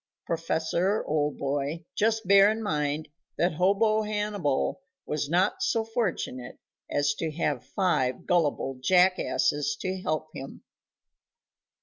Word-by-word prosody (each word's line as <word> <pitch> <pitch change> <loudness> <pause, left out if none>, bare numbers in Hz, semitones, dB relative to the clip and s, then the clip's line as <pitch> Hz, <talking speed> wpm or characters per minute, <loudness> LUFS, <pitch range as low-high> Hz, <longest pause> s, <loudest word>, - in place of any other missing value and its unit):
Prof., 160 -1 -2 0.3
old 150 -1 0
boy, 145 +4 -2
just 220 -1 0
bear 200 +1 +7
in 220 +1 -2
mind 150 -4 -1 0.3
that 175 0 +2
hobo 200 +6 +3
Hannibal 210 - -1 0.2
was 150 -1 -2
not 180 +5 +1
so 225 -1 +1
fortunate 195 - -3 0.3
as 145 0 +1
to 165 - -1
have 145 -5 -1
five 130 -6 0
gullible 145 -7 0
jackasses 180 -3 +2
to 185 0 -3
help 155 -2 -2
him. 135 - -9
165 Hz, 115 wpm, -27 LUFS, 145-200 Hz, 0.3 s, bear